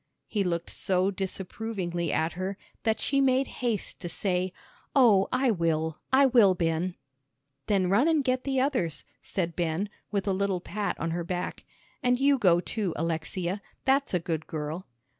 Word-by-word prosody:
He 205 -3 0
looked 170 -2 -2
so 185 +1 +1
disapprovingly 190 -2 -3
at 160 +1 0
her 185 +2 -3 0.2
that 220 -1 +1
she 275 -1 +2
made 265 0 +3 0.2
haste 230 -5 -1
to 175 - -5
say, 180 +1 -1 0.4
"Oh, 220 -8 +6
I 255 -1 +3
will, 160 -4 0
I 270 +1 +6
will, 230 -8 +6
Ben." 170 +1 0 0.7
"Then 195 -3 +2
run 205 - +4
and 315 -3 +3
get 255 -1 0
the 270 -1 0
others," 245 - 0 0.2
said 170 -4 -2
Ben, 175 +4 -1 0.2
with 200 -1 -1
a 195 - +2
little 195 -1 0
pat 200 +3 -3
on 165 - -1
her 170 +1 -2
back. 180 +1 -4 0.4
"And 250 -2 +2
you 275 0 +4
go, 175 -6 +5
too, 195 -1 -2
Alexia, 170 +4 -2 0.2
that's 270 -5 +2
a - - +3
good 160 -2 -3
girl." 155 +3 -4
190 Hz, 165 wpm, -28 LUFS, 170-235 Hz, 0.7 s, Oh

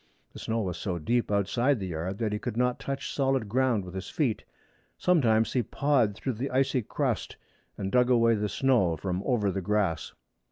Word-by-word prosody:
The - - -9
snow 115 0 -1
was 90 -4 -3
so 90 -4 -2
deep 115 +10 0
outside 115 +6 +1
the 95 - -3
yard 85 +4 -4
that 110 -2 -1
he 105 - -2
could 115 0 -4
not 125 0 +1
touch 135 0 -4
solid 135 -5 +1
ground 120 -3 +1
with 90 - -9
his 95 -1 -6
feet. 130 -9 -1 0.5
Sometimes 115 -11 +3
he 125 - +2
pawed 125 -3 +1
through 130 +4 -3
the 125 +5 -3
icy 130 0 +1
crust, 105 - -2 0.4
and 95 -1 -3
dug 125 0 +3
away 115 -2 +4
the 105 -1 -1
snow 105 -8 +2
from 90 +2 -2
over 110 -7 +1
the 95 - -3
grass. 100 -3 -1
115 Hz, 195 wpm, -28 LUFS, 100-130 Hz, 0.5 s, away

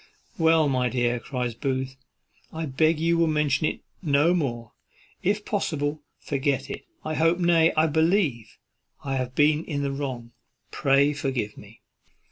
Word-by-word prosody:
"Well, 160 -1 +4
my 130 -2 +1
dear," 120 0 0
cries 125 -1 -3
Booth, 130 +1 -3 0.6
"I 160 0 -4
beg 155 +3 +2
you 170 +1 +2
will 165 - +4
mention 150 -1 +1
it - - -4 0.2
no 150 0 +3
more; 120 -9 -2 0.5
if 210 +2 0
possible, 150 -7 -2 0.2
forget 135 -1 -2
it. - - -7 0.2
I 155 - -2
hope, 165 +2 +2
nay, 170 -2 +4
I 155 - +5
believe, 160 - +1 0.5
I 135 -2 -2
have 130 0 -3
been 150 +1 +3
in 145 -4 -3
the 140 - -1
wrong; 130 -4 -5 0.4
pray 140 0 +3
forgive 130 -7 -3
me." 105 +2 -15
145 Hz, 150 wpm, -25 LUFS, 130-160 Hz, 0.6 s, I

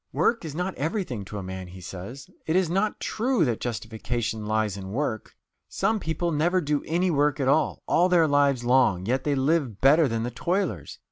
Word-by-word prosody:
"Work 235 -4 +1
is 155 -3 -6
not 180 +3 -2
everything 145 - -2
to 105 - -7
a 100 - -5
man," 95 0 -6
he 90 +1 -11
says; 95 +8 -8 0.2
"it 160 - +1
is 185 -3 +2
not 200 +4 0
true 235 -5 0
that 120 -4 -1
justification 115 -1 -3
lies 110 -2 0
in 95 -1 -7
work... 110 -1 -3 0.3
Some 215 +3 0
people 170 0 -2
never 170 +4 +2
do 150 -3 -1
any 175 +3 +1
work 145 -2 +1
at 135 - 0
all, 150 +3 +1
all 180 +2 +3
their 170 -3 +4
lives 140 -3 +2
long 120 -7 +3
yet 130 +5 -1
they 145 -1 +1
live 135 - 0
better 150 +3 +5
than 115 -2 -2
the 120 - -3
toilers. 170 - -2
140 Hz, 200 wpm, -26 LUFS, 110-170 Hz, 0.3 s, better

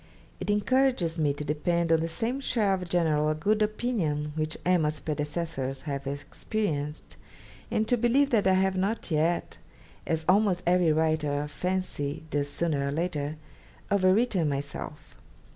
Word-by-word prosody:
It - - -4
encourages 205 -5 +2
me 150 -2 +3
to 150 +1 -6
depend 165 +3 0
on 165 - +5
the 165 - -1
same 225 +11 -2
share 220 -7 +1
of 180 -2 -3
general 155 -3 +2
good 210 +8 +1
opinion 205 -10 0
which 155 0 -2
"Emma's" 155 -4 +2
predecessors 150 -3 -3
have 140 -2 -4
experienced, 150 +2 -3 0.5
and 215 0 0
to 245 - +3
believe 255 +5 +3
that 210 -5 +3
I 190 - +5
have 190 0 +2
not 195 +1 -1
yet, 160 +3 0 0.5
as 160 -1 -1
almost 190 -2 +3
every 175 -2 +4
writer 155 -2 +1
of 150 - -7
fancy 180 -5 -2
does 145 -1 0
sooner 145 -2 0
or - - -1
later, 155 -2 -2 0.6
overwritten 195 -2 +3
myself. 140 0 -6
165 Hz, 145 wpm, -28 LUFS, 150-195 Hz, 0.6 s, on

